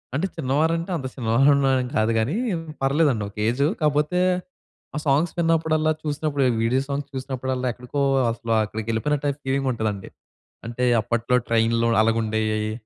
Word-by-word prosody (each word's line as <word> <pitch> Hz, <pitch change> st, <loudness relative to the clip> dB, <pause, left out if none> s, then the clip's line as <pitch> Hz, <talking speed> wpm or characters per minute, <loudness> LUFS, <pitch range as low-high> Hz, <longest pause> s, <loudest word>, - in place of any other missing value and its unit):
అంటే 185 Hz, +7 st, 0 dB
చిన్నవారంటే 160 Hz, +4 st, 0 dB
అంత 130 Hz, -3 st, -4 dB
చిన్నవారళ్ళం 135 Hz, +4 st, +3 dB
ఏం 125 Hz, -, -4 dB
కాదు 110 Hz, +1 st, +2 dB
గాని 115 Hz, +9 st, 0 dB, 0.5 s
పర్లేదండి 135 Hz, -5 st, +2 dB
ఒక -, -, -20 dB
ఏజు. 140 Hz, +5 st, +2 dB
కాపోతే 150 Hz, +4 st, +1 dB, 0.8 s
ఆ -, -, -1 dB
సాంగ్స్ 150 Hz, +4 st, +2 dB
విన్నప్పుడల్లా 160 Hz, -2 st, +2 dB
చూసినప్పుడు 145 Hz, -2 st, -1 dB, 0.2 s
వీడియో 125 Hz, +4 st, +2 dB
సాంగ్స్ 140 Hz, 0 st, -4 dB
చూసినప్పుడల్లా 130 Hz, -1 st, -3 dB
ఎక్కడికో 125 Hz, +4 st, -4 dB, 0.3 s
అసలు 115 Hz, 0 st, -3 dB
అక్కడికెళ్ళిపోయినట్టై 115 Hz, +7 st, -1 dB
ఫీలింగుంటాదండి. 125 Hz, -7 st, -2 dB, 0.6 s
అంటే 120 Hz, +2 st, -3 dB, 0.2 s
అప్పట్లో 120 Hz, +2 st, 0 dB
ట్రైన్‌లో 115 Hz, 0 st, +2 dB
అలాగుండేయి. 110 Hz, -1 st, 0 dB
130 Hz, 120 wpm, -23 LUFS, 115-145 Hz, 0.8 s, చిన్నవారళ్ళం